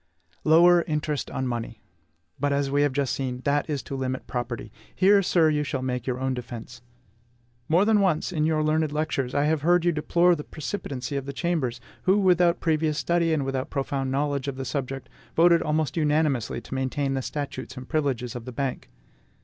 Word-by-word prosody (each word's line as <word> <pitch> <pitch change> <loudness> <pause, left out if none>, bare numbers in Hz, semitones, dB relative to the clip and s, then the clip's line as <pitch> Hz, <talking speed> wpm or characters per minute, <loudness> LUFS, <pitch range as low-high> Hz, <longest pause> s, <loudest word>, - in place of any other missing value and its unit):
Lower 170 +2 +6
interest 150 -2 -2
on 130 - -3
money! 120 -2 -4 0.6
But, 145 +1 +1
as 140 -1 0
we 145 +1 +2
have 145 -1 +3
just 135 -2 0
seen, 130 -2 -3
that 145 +2 +1
is 145 -5 -2
to 135 - -6
limit 130 -1 -3
property. 120 -3 -4 0.2
Here, 200 +2 +5
sir, 170 -3 +3
you 150 -1 +1
shall 135 -3 -3
make 125 -1 -3
your 125 -1 -1
own 130 0 0
defence. 120 -1 -8 0.9
More 175 +5 +4
than 215 -1 +4
once, 185 -3 +1
in 155 -2 +1
your 155 -1 +1
learned 155 0 +1
lectures, 150 -4 -2
I 145 - +3
have 155 0 +1
heard 175 +2 +3
you 175 - +4
deplore 170 +3 +3
the 150 - -6
precipitancy 145 -5 -5
of 135 0 -5
the 140 - -4
Chambers, 140 -7 -1 0.3
who, 190 +2 +4
without 180 -3 +3
previous 155 -2 +1
study 170 +3 +1
and 150 -4 +1
without 135 -1 -2
profound 135 -1 -2
knowledge 140 0 -1
of 140 - -3
the 135 0 -5
subject, 135 0 -4 0.3
voted 170 0 +5
almost 155 -1 0
unanimously 150 -7 +1
to - - -9
maintain 135 +1 -1
the 135 - -1
statutes 135 -2 -5
and 130 0 -8
privileges 135 -7 -1
of 120 -1 -6
the 130 - -6
Bank. 135 0 -3
145 Hz, 195 wpm, -25 LUFS, 130-160 Hz, 0.9 s, Lower